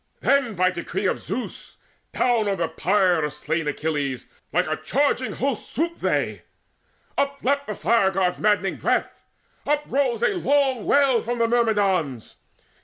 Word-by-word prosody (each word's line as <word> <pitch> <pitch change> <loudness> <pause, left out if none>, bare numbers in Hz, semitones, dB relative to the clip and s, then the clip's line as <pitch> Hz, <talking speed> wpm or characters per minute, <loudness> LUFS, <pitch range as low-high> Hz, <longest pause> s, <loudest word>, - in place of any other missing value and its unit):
Then 275 -6 +2
by 185 +1 +3
decree 170 -1 -4
of - - +1
Zeus - - -6 0.3
down 235 -4 +1
on 195 -1 0
the 170 -2 0
pyre 180 0 +2
Of 150 -1 -2
slain 160 +1 -2
Achilles, 145 -3 -2 0.3
like - - +2
a - - -1
charging 280 -2 0
host 270 -4 -3
Swooped 335 +3 -2
they; - - 0 0.8
upleapt 280 0 0
the 210 - -4
Fire 230 -5 +3
god's 190 -2 0
madding 205 -2 +1
breath: - - -1 0.4
Uprose 280 -5 0
a - - +4
long 275 - +1
wail 275 -4 +4
from 240 +1 -3
the 230 -1 +2
Myrmidons. 200 - 0
215 Hz, 145 wpm, -23 LUFS, 180-270 Hz, 0.8 s, a